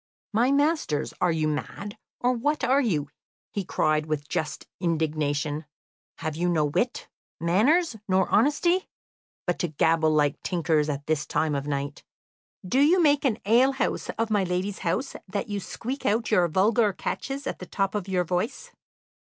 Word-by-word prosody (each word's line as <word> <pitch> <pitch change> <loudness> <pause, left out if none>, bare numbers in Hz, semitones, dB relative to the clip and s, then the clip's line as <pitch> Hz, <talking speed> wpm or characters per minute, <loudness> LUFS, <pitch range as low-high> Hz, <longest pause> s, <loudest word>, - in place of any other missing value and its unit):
"My 235 +4 +3
masters, 285 - +1
are 180 - +3
you 160 -1 0
mad, 200 +7 -4 0.2
or 250 +1 +2
what 290 +6 -1
are 270 +3 +4
you?" 155 - 0 0.4
he 200 - -2
cried, 155 -3 +1
with 150 -1 -2
just 155 -1 -3
indignation. 155 -3 -1 0.5
"Have 155 -2 -4
you 175 +2 0
no 160 -3 +2
wit, 235 - -1 0.3
manners, 225 - +3
nor 190 0 +3
honesty, 320 - +2 0.6
but 175 - -1
to 175 - 0
gabble 160 +1 +2
like 150 -2 +2
tinkers 160 -4 +1
at 145 -1 -3
this 155 -1 -1
time 155 -1 0
of 140 0 -2
night? 140 0 -3 0.6
Do 255 +8 +2
you 320 +6 +5
make 290 -3 +3
an 230 -5 +2
alehouse 260 +5 +2
of 225 0 -1
my 205 -2 +3
lady's 185 +2 -2
house 190 +10 -2
that 200 +2 -3
you 205 -1 -2
squeak 250 +7 -5
out 225 +3 +1
your 180 -5 +4
vulgar 210 +5 +3
catches 275 +8 -4
at - - -4
the 180 - -8
top 195 +1 -1
of 205 -3 -3
your 185 -2 +1
voice? 185 - -3
185 Hz, 165 wpm, -26 LUFS, 155-240 Hz, 0.6 s, you